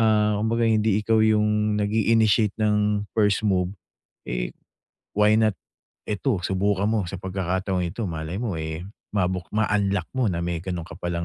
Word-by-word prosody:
ah, 105 -2 +3
kumbaga 115 +2 +1
hindi 110 -2 +2
ikaw 110 0 +3
yung 105 -1 +2
nag 105 0 0
iinitiate 110 -1 +3
ng 105 -1 +1
first 105 -1 +2
move, 95 -1 +1 0.5
eh, - - -2 0.6
why 105 +1 +4
not 110 -2 +3 0.6
eto 105 -1 0
subukan 100 +2 0
mo 110 -4 0
sa 95 +2 -6
pagkakataong 95 0 -1
ito 100 +4 -3
malay 80 +5 -4
mo, 105 -9 -2
eh, 80 +1 -4 0.3
mabuk 90 -2 0
ma-unlock 100 -4 +1
mo 125 - +2
na 85 -3 -1
may 85 -1 -2
gano'n 90 -1 -4
ka 85 - -11
palang 85 -1 -2
105 Hz, 160 wpm, -24 LUFS, 90-110 Hz, 0.6 s, why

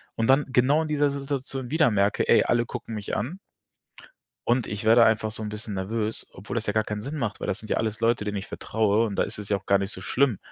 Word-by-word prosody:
und 115 - 0
dann 135 +2 +5
genau 135 +5 +3
in - - -4
dieser 145 -1 +2
Situation 135 -2 -4
wieder 160 -5 +4
merke: 100 0 +1
„Ey, - - +6
alle 120 0 +1
gucken 115 - -6
mich 105 -1 -4
an.“ 145 - -3 1.1
Und 120 -1 +2
ich 105 +2 -5
werde 115 +1 +7
einfach 110 0 +2
so 110 +1 -5
'n 105 - -3
bisschen 105 0 -6
nervös, 105 +3 -3
obwohl 100 +5 -7
das 115 - -2
ja 105 - 0
gar 110 +1 +2
keinen 105 -1 -4
Sinn 140 +7 -5
macht, 115 -8 -2
weil - - -4
das 95 - -2
sind 110 - -11
ja - - +2
alles 110 0 -2
Leute, 115 -1 +2
denen 105 0 -3
ich 95 - -7
vertraue 110 +1 +1
und 100 - -4
da - - +3
ist - - -5
es 105 - -7
ja 100 - +2
auch 95 - -11
gar 100 0 +4
nicht 100 +2 -3
so 95 - -8
schlimm, 120 +1 +1
110 Hz, 270 wpm, -26 LUFS, 105-125 Hz, 1.1 s, werde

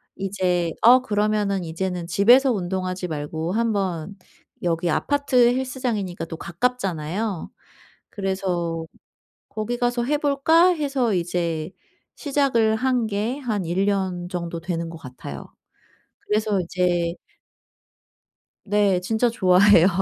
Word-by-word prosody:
이제 185 -3 -1
어 250 +3 +8
그러면은 210 -4 0
이제는 175 +1 -3
집에서 245 +9 +5
운동하지 185 -1 -3
말고 160 +3 -3
한번 200 -5 -1 0.5
여기 170 0 0
아파트 285 - 0 0.2
헬스장이니까 240 -10 -3
또 165 -1 -8
가깝잖아요. 190 -2 -2 0.6
그래서 180 -4 -2 0.6
'거기 220 +3 -4
가서 240 0 0
해볼까?' 295 +4 +3
해서 275 -7 0
이제 170 -2 -2 0.5
시작을 265 -7 +1
한 250 -1 +1
게 215 +6 -2
한 220 -7 -2
1 190 +4 0
년 185 -3 -1
정도 170 -2 -4
되는 170 -1 -3
것 165 - -9
같아요. 125 - -9 0.8
그래서 210 -2 +1
이제 175 -1 0 1.5
네, 205 -3 +2
진짜 220 +6 +1
좋아해요. 185 -3 +5
195 Hz, 235 characters per minute, -23 LUFS, 175-235 Hz, 1.5 s, 어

